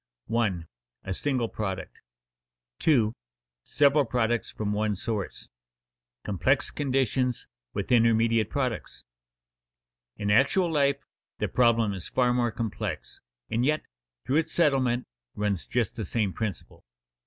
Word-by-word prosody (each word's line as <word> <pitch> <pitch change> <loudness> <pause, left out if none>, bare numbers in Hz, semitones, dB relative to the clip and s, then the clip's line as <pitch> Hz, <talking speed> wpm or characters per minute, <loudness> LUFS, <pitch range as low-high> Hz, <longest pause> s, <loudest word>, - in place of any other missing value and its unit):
[Illustration: 115 -4 +2
1. 85 -2 -9 0.4
A 95 - -3
single 130 +2 0
Product 95 -4 -4 0.8
2. 115 -8 +3 0.5
Several 145 0 +4
Products 120 -1 0
from 105 -1 -3
one 105 0 0
Source] 105 0 -3
[Sidenote: - - -14 0.8
Complex 130 +8 +1
conditions 130 -3 0 0.3
with - - -3
intermediate 115 -2 +4
products] 130 -6 -3 1.1
In 105 0 -1
actual 150 - +4
life 140 -2 +1 0.3
the - - -1
problem 115 -4 +3
is 95 -3 -6
far 125 -1 +2
more 120 -1 +1
complex, 115 -2 -4 0.3
and 115 +2 +1
yet, 155 +3 +1 0.4
through 140 - +2
its 160 0 0
settlement 130 -6 +2 0.3
runs 105 -3 -1
just 120 -3 -1
the 110 -3 -4
same 100 0 0
principle. 110 -4 -5
115 Hz, 125 wpm, -27 LUFS, 105-135 Hz, 1.1 s, Several